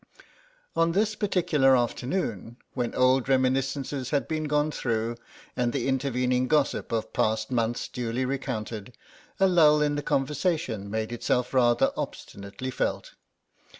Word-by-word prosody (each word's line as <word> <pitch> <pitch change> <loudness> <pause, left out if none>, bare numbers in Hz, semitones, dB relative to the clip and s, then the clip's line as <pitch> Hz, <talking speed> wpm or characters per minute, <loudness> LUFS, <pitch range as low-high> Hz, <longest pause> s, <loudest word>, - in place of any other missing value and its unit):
On 165 0 +2
this 210 +3 +2
particular 165 -10 +3
afternoon, 120 - -2 0.2
when 120 -3 -2
old 130 +1 +3
reminiscences 135 0 0
had 145 -1 0
been 155 -1 -2
gone 150 +1 +1
through, 115 -3 -2 0.4
and 120 -1 0
the - - -1
intervening 125 -1 +1
gossip 150 -1 +1
of 115 -1 -2
past 110 +2 0
months 120 -1 0
duly 125 +1 -2
recounted, 120 -4 -4 0.4
a 195 - +5
lull 155 -5 +5
in 150 -1 +1
the 145 - -2
conversation 140 - -1
made 110 +2 -2
itself 125 +1 -1
rather 120 -2 +3
obstinately 100 +6 -6
felt. - - -2
130 Hz, 130 wpm, -27 LUFS, 120-150 Hz, 0.4 s, a